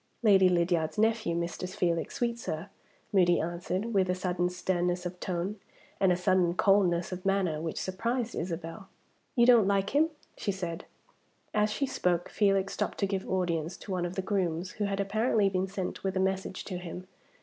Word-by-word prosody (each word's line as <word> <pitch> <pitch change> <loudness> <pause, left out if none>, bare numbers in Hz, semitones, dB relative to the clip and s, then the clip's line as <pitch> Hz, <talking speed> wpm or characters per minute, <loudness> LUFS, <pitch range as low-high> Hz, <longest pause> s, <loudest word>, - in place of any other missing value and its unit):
"Lady 195 -4 +6
Lydiard's 170 -2 +1
nephew, 220 -5 +2
Mr. 170 +2 -3
Felix 170 -3 -1
Sweetsir," 235 -9 -2 0.4
Moody 175 -3 +4
answered, 180 +6 -2
with 190 -2 +2
a 180 - +2
sudden 180 -1 0
sternness 180 0 -1
of 180 0 -5
tone, 185 +3 -3 0.4
and 190 -2 +4
a 175 - +2
sudden 180 -1 +2
coldness 185 -3 +3
of 185 0 -5
manner, 190 -6 +1
which 160 -1 -3
surprised 235 +5 -2
Isabel. 170 +3 -5 0.5
"You 240 -2 +5
don't 235 -5 +6
like 200 0 +1
him?" 305 +4 +3 0.3
she 200 - -2
said. 175 -3 -5 0.7
As 210 0 +3
she 275 +6 -1
spoke, 175 -9 0
Felix 195 -2 +2
stopped - - -2
to 200 - +1
give 195 -1 -3
audience 175 -2 -1
to 200 - -9
one 180 -2 0
of 175 - -8
the 190 - -2
grooms, 185 -3 -1
who 210 - -2
had 200 0 -2
apparently 210 +1 +2
been 190 0 0
sent 190 -1 -4
with 190 -1 -1
a - - +2
message 190 0 -1
to 185 -3 -4
him. 180 +1 -7
185 Hz, 180 wpm, -29 LUFS, 175-200 Hz, 0.7 s, Lady